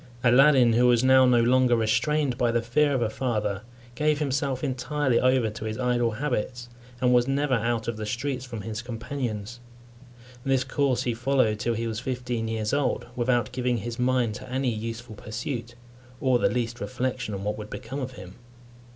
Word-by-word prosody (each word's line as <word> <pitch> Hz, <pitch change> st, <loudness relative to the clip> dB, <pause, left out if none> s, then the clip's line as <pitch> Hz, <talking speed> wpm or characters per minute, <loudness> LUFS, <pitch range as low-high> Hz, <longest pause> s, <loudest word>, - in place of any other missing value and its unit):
Aladdin, 125 Hz, -1 st, +6 dB
who 120 Hz, +2 st, +4 dB
was 120 Hz, 0 st, +4 dB
now 130 Hz, 0 st, +6 dB
no 125 Hz, -1 st, +5 dB
longer 125 Hz, +1 st, +4 dB
restrained 120 Hz, +5 st, +1 dB
by 120 Hz, 0 st, +1 dB
the 120 Hz, 0 st, 0 dB
fear 145 Hz, +5 st, +2 dB
of 130 Hz, -3 st, +1 dB
a 110 Hz, -, 0 dB
father, 105 Hz, -6 st, -1 dB, 0.3 s
gave 150 Hz, +3 st, +1 dB
himself 135 Hz, -2 st, -1 dB
entirely 135 Hz, -1 st, 0 dB
over 130 Hz, -3 st, +2 dB
to 105 Hz, +1 st, -7 dB
his 110 Hz, 0 st, -3 dB
idle 120 Hz, -2 st, +1 dB
habits, 120 Hz, -1 st, -3 dB, 0.3 s
and 125 Hz, -1 st, +3 dB
was 120 Hz, 0 st, +4 dB
never 140 Hz, 0 st, +1 dB
out 115 Hz, -1 st, 0 dB
of 115 Hz, -2 st, -2 dB
the 110 Hz, -, -4 dB
streets 125 Hz, +3 st, -2 dB
from 120 Hz, -4 st, -7 dB
his 110 Hz, +2 st, -5 dB
companions. 120 Hz, -2 st, -5 dB, 0.8 s
This 135 Hz, -1 st, +2 dB
course 130 Hz, -1 st, 0 dB
he 120 Hz, -, 0 dB
followed 120 Hz, -3 st, +1 dB
till 120 Hz, +1 st, 0 dB
he 115 Hz, +1 st, -2 dB
was 110 Hz, -1 st, -3 dB
fifteen 125 Hz, -3 st, -3 dB
years 110 Hz, -1 st, -2 dB
old, 145 Hz, -1 st, 0 dB
without 120 Hz, -2 st, +1 dB
giving 125 Hz, -1 st, 0 dB
his 115 Hz, +2 st, -5 dB
mind 125 Hz, -3 st, +1 dB
to 120 Hz, -, -9 dB
any 130 Hz, -1 st, 0 dB
useful 115 Hz, +1 st, -5 dB
pursuit, 115 Hz, +2 st, -5 dB, 0.4 s
or 130 Hz, -2 st, +2 dB
the -, -, +3 dB
least 120 Hz, -1 st, -2 dB
reflection 110 Hz, 0 st, -3 dB
on 100 Hz, -, -6 dB
what 105 Hz, +1 st, -2 dB
would 105 Hz, 0 st, -7 dB
become 135 Hz, -, -6 dB
of 130 Hz, -1 st, -5 dB
him. 90 Hz, -5 st, -11 dB
120 Hz, 185 wpm, -26 LUFS, 115-130 Hz, 0.8 s, Aladdin